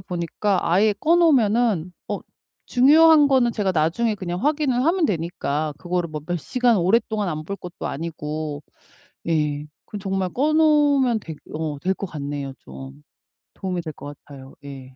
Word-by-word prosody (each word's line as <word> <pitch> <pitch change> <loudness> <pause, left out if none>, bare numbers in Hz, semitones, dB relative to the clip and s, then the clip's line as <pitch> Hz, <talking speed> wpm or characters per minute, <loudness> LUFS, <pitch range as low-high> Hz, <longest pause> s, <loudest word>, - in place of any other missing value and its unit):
보니까 180 +1 -2
아예 205 +5 +4
꺼 310 +12 +2
놓으면은 230 - +2 0.2
어 - - -2 0.5
중요한 300 +4 +6
거는 260 -4 +3
제가 205 -4 0
나중에 180 +8 +1
그냥 180 0 -5
확인을 290 -4 +1
하면 340 +2 +2
되니까 155 - -2
그거를 175 -1 -2
뭐 155 -1 -6
몇 175 +1 -2
시간 245 - +1
오랫동안 210 +2 +1
안 155 -1 -4
볼 200 +5 -5
것도 180 -2 -8
아니고 150 -1 -5 0.7
예. 150 -3 0 0.2
그럼 210 - -7
정말 190 -1 -1
꺼 290 +5 +1
놓으면 290 -6 +3
될 160 -4 -8 0.2
어 155 -2 -4
될 185 +6 0
것 195 - -6
같네요 145 -3 -5
좀. 65 +1 -11 0.5
도움이 185 -2 -3
될 160 -2 -6
것 145 0 -9
같아요. 135 -2 -13
예. 135 -2 -10
180 Hz, 300 characters per minute, -22 LUFS, 155-240 Hz, 0.7 s, 중요한